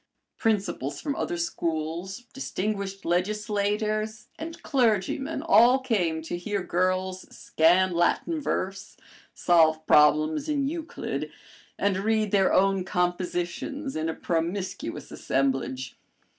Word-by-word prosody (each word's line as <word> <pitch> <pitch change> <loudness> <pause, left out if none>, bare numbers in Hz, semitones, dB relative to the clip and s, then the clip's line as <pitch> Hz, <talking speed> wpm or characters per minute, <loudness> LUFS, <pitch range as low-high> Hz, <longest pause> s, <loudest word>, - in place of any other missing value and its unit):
Principals 195 - -1
from 285 -2 -3
other 175 - -2
schools, 170 +4 -3
distinguished 200 -6 -3
legislators, 210 +3 -1
and 325 +1 -7
clergymen 265 +4 0
all 250 -5 +6
came 185 -12 0
to 165 - -4
hear 200 +1 -2
girls 185 +1 -1
scan 180 +4 +3
Latin 235 - +1
verse, 195 -7 -3 0.4
solve 160 -2 +3
problems 155 - +4
in 285 -2 +1
Euclid, 325 +2 -4 0.5
and 200 -2 +1
read 215 +1 +1
their 195 -2 +3
own 195 0 +3
compositions 180 - -2
in 155 +1 -1
a 160 - -3
promiscuous 180 +3 -3
assemblage. 130 -1 -1
190 Hz, 105 wpm, -26 LUFS, 170-215 Hz, 0.5 s, all